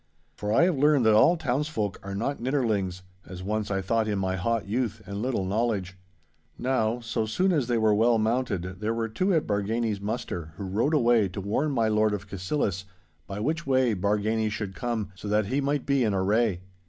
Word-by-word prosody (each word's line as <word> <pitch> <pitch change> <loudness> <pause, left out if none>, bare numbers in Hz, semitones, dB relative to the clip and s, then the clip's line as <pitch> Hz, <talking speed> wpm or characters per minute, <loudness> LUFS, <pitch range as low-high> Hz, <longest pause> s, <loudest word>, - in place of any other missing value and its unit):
For 105 0 -3
I 115 - +5
have 175 -6 +2
learned 145 -3 +4
that 110 - +6
all 165 +11 +5
townsfolk 130 - -2
are 100 0 -6
not 120 +7 -2
nidderlings, 110 -9 -1 0.2
as 90 +1 -9
once 105 +1 -2
I 95 -1 -1
thought 110 +3 +1
in 105 -1 0
my 95 -1 -1
hot 115 +4 -1
youth 115 +2 -2
and 100 +2 -5
little 120 -6 -1
knowledge. 100 -2 -1 0.6
Now, 120 -2 0
so 115 -1 -2
soon 185 - +1
as 145 -8 +1
they 120 -1 +1
were 110 -1 +3
well 115 +2 +4
mounted 110 -5 -1
there 110 +2 -1
were 115 -1 -1
two 185 - 0
at 160 - +1
Bargany's 105 +1 -1
muster 90 -7 -4
who - - -5
rode 110 +11 0
away 120 -6 +4
to 95 +2 -6
warn 105 +10 0
my 115 -6 +1
Lord 110 -1 +2
of 100 0 -8
Cassillis 95 - -2 0.4
by 100 +1 -5
which 160 +8 -2
way 130 -3 +3
Bargany 105 +3 0
should 105 -2 -4
come, 115 -2 -3
so 95 +2 -9
that 105 0 +2
he 130 +7 0
might 140 0 -1
be 140 -2 +2
in 105 -3 +1
array. 100 0 +1
110 Hz, 205 wpm, -27 LUFS, 100-125 Hz, 0.6 s, that